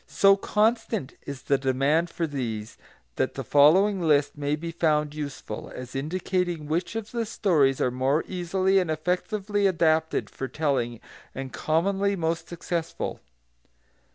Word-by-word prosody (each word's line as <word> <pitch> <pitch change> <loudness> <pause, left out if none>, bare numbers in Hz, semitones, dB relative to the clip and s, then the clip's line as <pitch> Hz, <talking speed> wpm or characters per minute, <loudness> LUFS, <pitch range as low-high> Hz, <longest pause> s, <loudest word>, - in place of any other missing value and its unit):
So 195 0 +5
constant 215 - 0
is 140 -2 -6
the 140 -1 +2
demand 140 +6 +1
for 165 - -2
these 115 -7 -4 0.4
that - - 0
the - - -4
following 185 +8 +5
list 145 -3 +2
may 145 0 -1
be 165 +2 -5
found 150 -3 +1
useful, 140 -7 -6
as 125 0 -8
indicating 175 +2 -1
which 170 +7 -2
of 225 -1 -4
the 235 -1 -1
stories 160 - +2
are 125 - +1
more 130 +5 +1
easily 190 +1 +1
and 180 -3 -1
effectively 195 +6 0
adapted 160 -3 +1
for 135 - -5
telling, 130 -6 -1 0.3
and 135 -1 -6
commonly 195 +5 +1
most 165 -1 -2
successful. 170 -1 -3
160 Hz, 140 wpm, -26 LUFS, 140-185 Hz, 0.4 s, So